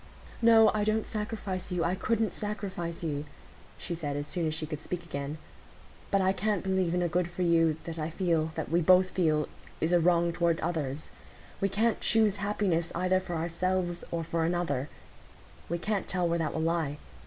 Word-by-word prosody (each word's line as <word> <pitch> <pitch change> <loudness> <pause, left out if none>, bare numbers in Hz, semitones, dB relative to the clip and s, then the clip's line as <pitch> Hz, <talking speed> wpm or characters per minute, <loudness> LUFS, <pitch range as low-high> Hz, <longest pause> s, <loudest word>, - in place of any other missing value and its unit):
"No, 225 -2 +7
I 210 -1 +1
don't 215 +1 +1
sacrifice 210 -4 -4
you—I 175 0 +1
couldn't 220 +3 0
sacrifice 195 -5 -4
you," 145 -3 -2 0.5
she 175 - -5
said, 150 -4 -3
as 145 0 -2
soon 170 -1 -1
as 155 - -1
she 160 - -3
could 155 -1 -5
speak 175 +1 -5
again; 140 -1 -4 0.7
"but 195 - +3
I 190 0 +3
can't 205 +1 0
believe 190 -3 +1
in 180 - +1
a - - +2
good 175 +1 0
for 180 +1 -3
you, 165 -2 +3
that 165 -1 -6
I 155 +1 -2
feel, 165 -2 0
that 160 - -3
we 170 +1 +3
both 185 +2 +5
feel, 155 -4 +2 0.3
is 160 - 0
a 175 - +5
wrong 170 0 +3
toward 170 -1 +1
others. 155 -4 -3 0.5
We 195 - +1
can't 220 +4 +1
choose 215 -2 +3
happiness 195 -4 0
either 185 +2 +2
for 185 -2 -5
ourselves 175 +2 -1
or 170 -1 -2
for 165 +1 -1
another; 160 -5 0 0.8
we 170 - 0
can't 205 +3 -2
tell 180 -2 0
where 170 0 0
that 160 -2 -1
will 160 - 0
lie. 160 -3 0
175 Hz, 190 wpm, -29 LUFS, 165-190 Hz, 0.8 s, No